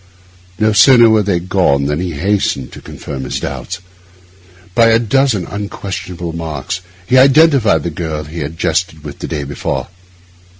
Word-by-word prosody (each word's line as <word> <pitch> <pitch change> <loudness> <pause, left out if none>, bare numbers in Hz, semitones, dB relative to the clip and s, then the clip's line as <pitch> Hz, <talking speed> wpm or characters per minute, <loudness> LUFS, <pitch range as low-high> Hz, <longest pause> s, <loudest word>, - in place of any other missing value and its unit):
No 110 +1 +2
sooner 115 +3 +7
were 110 -1 +4
they 95 -4 0
gone 85 -6 +1
than 75 +2 -1
he 90 -1 -3
hastened 85 -5 -1
to - - -11
confirm 70 -2 -7
his - - -3
doubts. 70 +7 -5 1.0
By 115 +2 +5
a 115 0 +5
dozen 120 -4 +1
unquestionable 95 -4 -6
marks 80 +2 -4 0.2
he 130 +6 +4
identified 135 -4 +4
the 85 - -3
girl 80 -1 -4
he 80 +3 -8
had 75 +2 -5
jested 80 -2 -1
with 70 -1 -9
the - - -5
day 75 - -3
before. 70 0 -4
90 Hz, 160 wpm, -15 LUFS, 75-110 Hz, 1.0 s, sooner